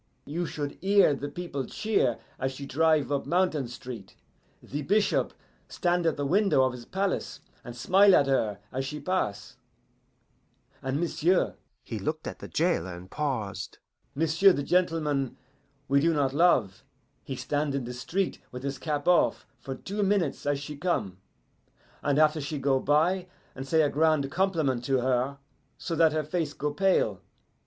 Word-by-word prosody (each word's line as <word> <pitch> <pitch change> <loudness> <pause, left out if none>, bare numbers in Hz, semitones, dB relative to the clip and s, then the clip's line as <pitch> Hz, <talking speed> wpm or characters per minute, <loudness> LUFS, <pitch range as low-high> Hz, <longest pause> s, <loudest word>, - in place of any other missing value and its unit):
"You 165 +4 -3
should 145 -1 -5
hear 195 -4 +5
the 145 +1 -4
people 145 -4 -4
cheer 205 - 0 0.2
as 130 0 -1
she 140 +1 -7
drive 155 +1 +2
up 140 - -1
Mountain 170 -7 +1
Street. 120 -4 -9 0.5
The 145 +2 -4
bishop 205 +8 +1 0.4
stand 175 -1 0
at 160 - +1
the 145 - -1
window 195 -3 +3
of 130 -1 +1
his 120 -1 -9
palace 190 0 -2 0.2
and 120 -1 -8
smile 190 +9 +5
at 140 - +4
her 110 -7 +1
as 130 +1 -2
she 150 +3 -5
pass, 185 - -2 1.2
and 135 +2 -2
m'sieu'" 175 +1 +1 0.3
he - - -5
looked - - -3
at - - -6
the - - -8
jailer 85 +2 0
and 90 +2 -12
paused 110 -10 -3 0.4
"m'sieu' 165 +6 +4
the 140 - -2
gentleman 155 -6 0 0.5
we 140 +1 +4
do 165 +1 +2
not 135 -2 +1
love, 135 - +3 0.4
he - - -5
stand 145 -1 -1
in 135 - -1
the 120 +1 -6
street 180 +10 -2
with 125 +1 -7
his 135 -1 -3
cap 145 0 -3
off 180 -1 +3
for 135 -1 -6
two 200 +10 -4
minutes 190 -9 0
as 145 -1 +1
she 150 +1 -7
come, 140 - -1 0.8
and 145 -1 +1
after 155 0 +4
she 145 +2 -4
go 135 -1 +2
by, 170 +7 +2 0.3
and 135 +1 -7
say 160 +2 +4
a 145 - +2
grand 155 -2 +2
compliment 160 -10 0
to 135 +1 +1
her, 130 +2 0 0.4
so 165 - -4
that 160 -1 +5
her 155 0 0
face 155 -1 -2
go 145 0 -2
pale. 150 - +2
145 Hz, 165 wpm, -28 LUFS, 135-175 Hz, 1.2 s, hear